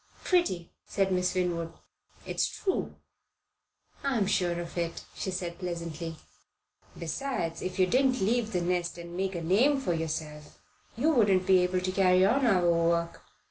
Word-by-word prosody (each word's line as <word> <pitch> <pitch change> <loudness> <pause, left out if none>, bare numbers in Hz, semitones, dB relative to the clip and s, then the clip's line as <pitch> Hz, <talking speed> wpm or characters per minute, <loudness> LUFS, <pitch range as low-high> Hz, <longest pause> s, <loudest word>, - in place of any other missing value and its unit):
"Pretty,"' 190 - +1 0.2
said 195 -1 0
Miss 180 0 +1
Winwood. 170 -2 -1 0.5
"It's - - 0
true." 380 - -2 1.1
"I'm 260 -7 +1
sure 175 -3 +1
of 170 -1 -7
it," 170 -1 -3
she - - -3
said 180 -2 -4
pleasantly. 170 -2 -5 0.8
"Besides, 170 - -3
if 185 - -4
you 185 - +5
didn't 255 +5 +2
leave 225 +2 +1
the 180 -4 0
nest 175 0 -1
and 170 0 -8
make 190 0 -2
a 170 - -4
name 245 - +3
for 260 -10 -1
yourself, 155 -2 -5 0.4
you 295 +7 +3
wouldn't 200 -9 +3
be 190 -1 +5
able 180 0 +1
to 185 0 -1
carry 185 -1 +4
on 265 +5 +3
our 180 -5 +3
work. 170 0 +1
180 Hz, 155 wpm, -29 LUFS, 170-200 Hz, 1.1 s, you